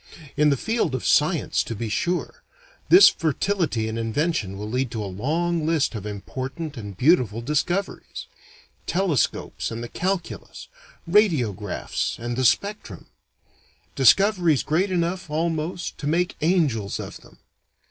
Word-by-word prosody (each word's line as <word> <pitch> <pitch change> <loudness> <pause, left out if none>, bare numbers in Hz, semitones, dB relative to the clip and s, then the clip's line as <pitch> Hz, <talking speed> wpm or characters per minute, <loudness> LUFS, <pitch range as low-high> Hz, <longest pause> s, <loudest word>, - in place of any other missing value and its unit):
In 150 0 +4
the 140 - +2
field 220 - -1
of 130 - -4
science 160 +1 +2
to 115 - -5
be 115 +2 -4
sure, 175 - -2 0.5
this 370 +3 +9
fertility 160 - -1
in 110 +1 -3
invention 115 - -1
will 105 +1 -5
lead 125 +3 -1
to 110 -2 -4
a - - -4
long 155 - -1
list 155 -4 +1
of 105 -2 -5
important 130 - -6
and 100 -5 -8
beautiful 125 - +3
discoveries: 150 +9 -2 0.6
telescopes 175 -7 0
and 115 +1 -5
the - - -5
calculus, 185 +5 -4 0.4
radiographs, 130 - +1
and 120 +1 -4
the 130 +1 0
spectrum. 200 - -1 0.9
Discoveries 175 - +4
great 175 +6 +1
enough, 180 0 -1
almost, 165 +2 -2
to 145 - -4
make 175 +3 0
angels 150 - +1
of - - -7
them. - - -19
150 Hz, 135 wpm, -24 LUFS, 115-175 Hz, 0.9 s, this